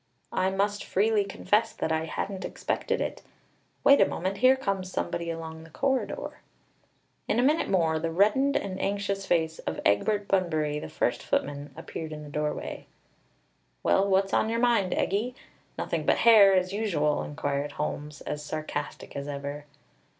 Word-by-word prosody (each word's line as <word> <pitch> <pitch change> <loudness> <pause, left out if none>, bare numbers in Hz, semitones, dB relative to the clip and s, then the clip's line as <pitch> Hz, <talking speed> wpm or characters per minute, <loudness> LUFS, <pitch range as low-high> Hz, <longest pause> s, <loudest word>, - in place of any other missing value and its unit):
I 185 0 +2
must 200 +1 0
freely 210 +1 +2
confess 205 +2 0
that 160 - -2
I 160 0 0
hadn't 190 +4 -4
expected - - -2
it. - - -3 0.6
Wait 280 - +7
a - - +6
moment, 190 +3 -3
here 255 +2 +6
comes 195 -7 -2
somebody 170 -2 -2
along 160 -1 -6
the 165 - -14
corridor." 265 - -2 0.9
In - - +1
a 245 - +3
minute 300 +5 +2
more, 165 -4 +2
the 165 +1 -1
reddened 215 +11 +3
and 190 -1 -2
anxious 200 -1 -1
face 160 -2 +1
of 80 - -4
Egbert 205 - +2
Bunbury, 155 -6 +1
the - - -7
first 120 - 0
footman, 145 0 -2
appeared 160 -1 -6
in 150 0 -7
the 150 - -9
doorway. 150 0 -3 1.0
"Well, 195 +1 +3
what's 195 0 +2
on 220 - +2
your 230 - 0
mind, 235 -6 +3
Eggie? 225 +6 0 0.4
Nothing - - -2
but - - +4
hair, 210 -4 +7
as 185 +1 +1
usual!" 165 -9 +1
inquired 145 -1 -3
Holmes, 150 0 -4
as 150 0 -4
sarcastic 155 +1 -5
as 140 0 -4
ever. 145 +1 -5
185 Hz, 160 wpm, -28 LUFS, 150-205 Hz, 1.0 s, Wait